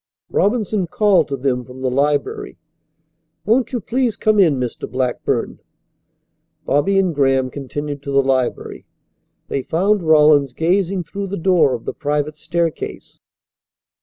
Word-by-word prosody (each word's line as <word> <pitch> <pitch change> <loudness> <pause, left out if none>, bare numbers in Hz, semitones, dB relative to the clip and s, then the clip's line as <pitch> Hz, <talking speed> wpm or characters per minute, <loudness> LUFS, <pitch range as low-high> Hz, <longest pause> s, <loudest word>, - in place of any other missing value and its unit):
Robinson 210 -3 0
called 200 - +3
to 140 - -3
them 125 -1 -1
from 125 +2 -12
the 130 -1 -1
library. 150 - -1 0.9
"Won't 240 +3 +2
you 250 - -1
please 235 +1 -1
come 215 -1 +2
in, 160 -9 +4
Mr. 125 -2 -4
Blackburn?" 130 -1 -2 1.1
Bobby 190 +8 +2
and 185 -3 +2
Graham 135 -2 +1
continued 145 +1 -5
to 140 - -6
the 140 0 +3
library. 130 -2 -2 0.6
They 135 - -2
found 195 +9 +1
Rawlins 150 -4 +4
gazing 180 +4 0
through 200 +5 -6
the 200 +1 -4
door 170 -7 +3
of 115 - -9
the - - -3
private 150 +1 -2
staircase. 170 +1 -4
155 Hz, 135 wpm, -19 LUFS, 135-195 Hz, 1.1 s, in